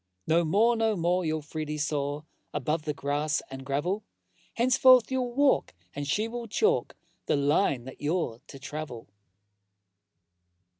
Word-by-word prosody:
No 170 +2 +3
more, 215 +9 +3
no 225 -1 +1
more 180 +1 +1
you'll 155 -1 -1
freely 150 0 -4
soar 150 0 -2 0.3
Above 150 +3 -1
the 150 - -1
grass 145 0 0
and 135 0 -7
gravel: 150 +10 -1 0.5
Henceforth 255 +1 +5
you'll 255 -2 -1
walk 280 - +2 0.2
and 145 0 -4
she 210 +10 0
will 235 0 -6
chalk 440 - +1 0.3
The - - +2
line 140 -2 +2
that 130 +1 -11
you're 150 -6 -1
to 140 - -10
travel! 140 -5 -7
155 Hz, 140 wpm, -28 LUFS, 145-220 Hz, 0.5 s, Henceforth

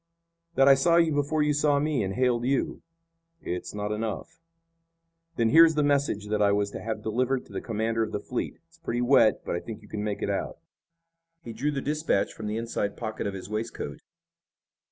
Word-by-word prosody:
"That 135 - +5
I 140 - +9
saw 150 +5 +3
you 165 -2 +4
before 145 +2 +1
you 150 0 +2
saw 145 0 +2
me 150 -2 0
and 95 0 -2
hailed 125 -2 +2
you." 135 +2 0 0.6
"It's 90 - -4
not 105 0 -3
enough." 115 +9 -4 1.0
"Then 115 -5 +2
here 165 +8 +8
is 160 -1 +4
the 150 - +2
message 140 -8 +1
that 105 0 0
I 100 -1 +4
was 100 0 0
to - - -6
have 110 -1 -4
delivered 125 +4 0
to - - -15
the - - -3
commander 115 0 -1
of 110 - -1
the 105 - -2
fleet. 125 +4 -4
It's 165 0 -25
pretty 120 -6 -2
wet, 120 -4 +4
but - - -2
I - - -1
think 110 +1 -9
you - - -15
can 105 0 -4
make 105 -1 -3
it - - -1
out." 100 - -3 0.9
He 115 - -7
drew 145 +6 -1
the 140 -2 -2
dispatch 150 -8 0
from 110 - -6
the 105 +1 -2
inside 115 -3 -2
pocket 110 -3 -4
of 100 - -4
his 95 -1 -7
waistcoat. 110 +2 -4
115 Hz, 215 wpm, -27 LUFS, 105-145 Hz, 1.0 s, I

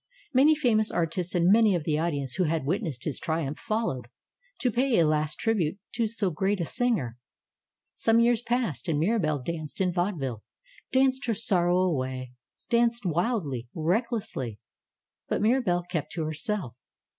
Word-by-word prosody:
Many 285 +5 +6
famous 225 -7 +2
artists 170 +2 -1
and 175 +1 +4
many 215 -2 +5
of 170 - -1
the 150 0 0
audience 145 -6 -1
who 185 - +2
had 160 -2 -1
witnessed 155 - -2
his 150 - -2
triumph 160 -2 -2
followed, 215 - -2 0.5
to 250 - +2
pay 250 +1 +2
a 165 - +5
last 155 0 +1
trib 225 -2 +1
ute 160 +2 0 0.2
to 230 -2 +1
so 210 -4 -1
great 190 +5 0
a 170 - 0
singer. 215 - 0 0.8
Some 225 - +2
3 235 - +5
^ears 240 -1 +2
passed 235 - -1
and 160 -3 +1
Mirabelle 155 - +1
danced 155 -2 -5
in 180 -2 +1
vaude 180 0 -1
ville, 125 -6 -3 0.5
danced 260 0 +2
her 230 - +1
sorrow 180 -6 +2
away, 130 -8 -1 0.4
danced 235 -1 +2
wildly, 170 - -1
recklessly. 175 - -1 0.7
But - - 0
Mirabelle 215 -6 +2
kept 175 -4 -4
to 165 - -2
herself. 155 - -2
175 Hz, 165 wpm, -27 LUFS, 155-225 Hz, 0.8 s, Many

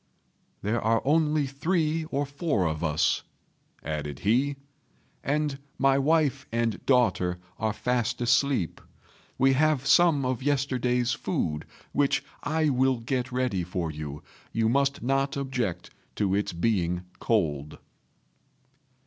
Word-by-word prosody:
"There 110 +4 0
are 115 0 +2
only 150 0 +3
three 160 +3 0
or 145 -2 -1
four 140 - -1
of 80 +1 -3
us," 75 -2 +2 0.6
added 75 -3 -4
he; 130 +7 +2 0.7
"and 145 -1 0 0.2
my 135 0 +3
wife 155 0 +2
and 115 -4 -1
daughter 115 -9 +3 0.2
are 110 0 +1
fast 125 +2 -1
asleep. 120 - +1 0.6
We 135 +1 +4
have 150 -1 +2
some 160 -4 +5
of 125 -1 -1
yesterday's 130 -3 +1
food, 75 -1 -2 0.3
which 140 -1 +1 0.2
I 155 +1 +1
will 130 -1 +2
get 125 +1 -2
ready 125 -8 0
for 85 -2 -3
you; 75 -1 -7 0.3
you 115 -1 +1
must 140 +3 +1
not 135 +2 0
object 125 -10 -3 0.2
to 100 -2 +1
its 100 +1 0
being 90 -1 0 0.2
cold." 75 -9 0
125 Hz, 125 wpm, -27 LUFS, 100-140 Hz, 0.7 s, some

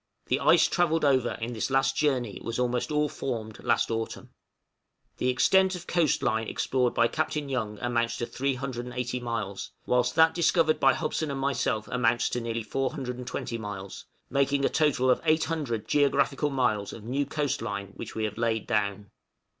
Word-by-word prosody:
The - - +2
ice - - +5
travelled 165 -3 +1
over 130 -4 +3
in 120 +2 -4
this 110 - -2
last 135 0 +2
journey 130 -8 0
was 115 0 -3
almost 125 +2 0
all 150 0 +2
formed 115 -6 -5
last - - +1
autumn. 115 0 -4 0.9
The 125 - 0
extent 190 +9 +4
of 175 - -8
coast 170 -5 +1
line 110 0 0
explored 125 -2 0
by 115 - +4
Captain 150 0 -2
Young 110 -5 -2
amounts 120 -1 0
to 120 - -2
380 125 -2 -3
miles, 115 -5 -4
whilst 125 0 +1
that 160 0 +6
discovered 165 -2 +3
by 135 -1 +5
Hobson 155 0 -2
and 140 -1 -3
myself 135 -5 0
amounts 120 -1 +1
to 120 - -2
nearly 115 0 -3
420 125 -1 -3
miles, 100 -3 -7 0.2
making 140 0 +1
a - - +3
total 145 -5 +2
of 125 - +1
800 155 -8 0
geographical 145 +1 +2
miles 120 -7 0
of 110 - -9
new 135 +5 -1
coast 145 -3 -1
line 100 -3 -4
which - - -8
we 110 - -2
have 105 +1 -3
laid 115 -2 0
down. 105 -2 -1
125 Hz, 170 wpm, -27 LUFS, 115-140 Hz, 0.9 s, that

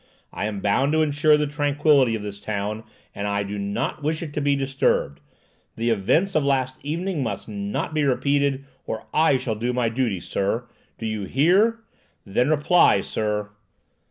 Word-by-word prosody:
I - - -3
am 105 -2 -4
bound 135 +10 +2
to 160 0 +3
insure 150 0 +3
the 150 - +1
tranquillity 145 -3 +2
of 105 - -5
this 100 -1 -7
town, 105 +1 -4 0.3
and 100 - -4
I 100 0 0
do 100 +1 -5
not 100 +9 -3
wish 155 +3 -1
it 150 -3 -7
to 150 - -2
be 140 0 +2
disturbed. 135 - 0 0.6
The 115 +1 0
events 155 - +1
of 155 - +2
last 130 -2 0
evening 165 +3 -2
must 115 -6 -4
not 100 +7 -3
be 155 -1 +1
repeated, 140 0 +1 0.2
or 110 - -4
I 155 -3 +4
shall 125 -3 -2
do 120 +3 -2
my 120 -2 +1
duty, 115 -5 -1
sir! 100 +7 -2 0.3
Do 115 - -6
you 110 -2 -3
hear? 190 - +3 0.4
Then 120 +7 +1
reply, 155 - +4
sir." 105 0 -2
130 Hz, 175 wpm, -23 LUFS, 105-145 Hz, 0.6 s, I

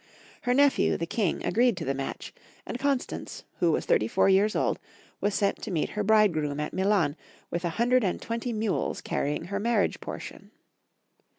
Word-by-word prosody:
Her 245 0 +1
nephew, 285 0 +4
the 165 - -2
King, 190 0 -1
agreed 240 -3 +3
to 165 - -4
the 135 - 0
match, 135 0 -5 0.3
and 245 - -5
Constance, 275 -1 -2 0.2
who 170 -2 +3
was - - 0
thirty 110 - +2
four - - +2
years 200 +3 +3
old, - - +1 0.4
was 205 0 0
sent 200 -1 0
to - - -5
meet 170 -5 -1
her 210 - -2
bride 215 -2 +5
groom 150 -2 -2
at 150 - -3
MUan 190 -6 +2 0.4
with 170 +1 -2
a - - +1
hundred 245 +1 +3
and 185 - 0
twenty 230 +1 -3
mules 215 -2 -1
carrying 145 +2 -2
her 200 +3 -3
marriage 225 -1 +1
portion. - - -8
200 Hz, 185 wpm, -27 LUFS, 165-230 Hz, 0.4 s, bride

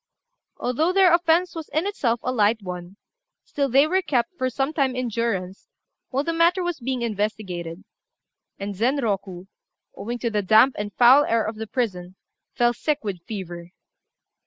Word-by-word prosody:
Although 310 +9 0
their 375 -3 +5
offence 340 +1 +3
was 325 -2 -7
in 315 +4 -1
itself 245 - -1
a 255 - -1
light 220 -2 +2
one, 180 +1 -7 0.5
still 280 -1 -1
they 270 +4 +5
were 370 +5 +1
kept 255 -1 -1
for 255 -5 -1
some 270 +4 -2
time 270 -4 0
in 255 -1 -2
durance 205 -5 -3 0.4
while 270 +2 -1
the 330 - -2
matter 340 +3 +3
was 350 -3 -3
being 255 0 -3
investigated; 200 -6 -3 0.7
and 200 +1 -5
Zenroku, 205 -6 -1 0.5
owing 235 +4 -5
to 235 -1 -2
the 210 -1 0
damp 220 +7 +5
and 205 0 -4
foul 255 +4 +7
air 230 -1 +1
of 215 0 -4
the 220 0 -5
prison, 190 -7 -3 0.4
fell 240 0 +3
sick 300 +3 -2
with 195 -5 -4
fever. 175 -4 -7
235 Hz, 165 wpm, -23 LUFS, 205-285 Hz, 0.7 s, foul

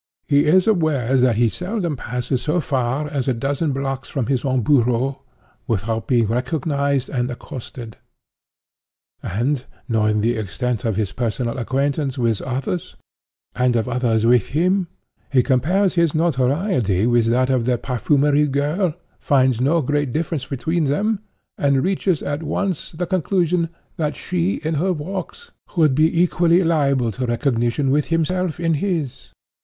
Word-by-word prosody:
He 145 0 +3
is 180 +4 +4
aware 155 - +1
that 125 -2 +3
he 120 +2 +3
seldom 180 - -3
passes 125 +1 -3
so 155 +7 0
far 135 -1 -1
as 140 -3 -3
a 130 - +1
dozen 140 +5 -1
blocks 135 -1 -3
from 135 -5 -2
his 130 -1 0
own 130 -2 +1
bureau, 125 0 +2 0.5
without 110 +1 -2
being 120 -3 +3
recognized 140 +3 -1
and 125 -1 -2
accosted. 120 -2 -8 1.2
And, 125 +7 -1 0.2
knowing 110 -2 +1
the 115 +2 +1
extent 110 +4 -3
of 110 -3 0
his 100 -2 -1
personal 120 0 -2
acquaintance 140 +2 -1
with 115 -4 0
others, 135 +7 -3 0.6
and 125 -1 +1
of 115 +1 0
others 120 -3 +1
with 120 -3 +4
him, 180 +5 +1 0.4
he 130 -3 +4
compares 175 +10 +2
his 170 -4 +2
notoriety 135 - +1
with 120 -1 +3
that 130 +3 +2
of 125 -3 +1
the 125 -1 +1
perfumery 145 +4 +2
girl, 150 +5 0 0.2
finds 130 -4 +2
no 155 +4 +2
great 145 0 0
difference 155 -1 -2
between 155 +5 -1
them, 200 +10 0 0.4
and 140 -2 +2
reaches 185 -3 0
at 145 +2 -3
once 185 +1 -2
the 180 +3 -3
conclusion 175 -2 0 0.3
that 150 -2 -1
she, 180 +1 -1
in 160 +1 -1
her 180 +5 +1
walks, 190 - -6 0.3
would 155 -5 +4
be 160 +4 +3
equally 175 0 +3
liable 140 -7 +2
to 125 +4 -3
recognition 120 +2 0
with 145 +1 +1
himself 165 +1 0
in 165 -1 +1
his. 160 -5 -3
140 Hz, 150 wpm, -21 LUFS, 125-165 Hz, 1.2 s, is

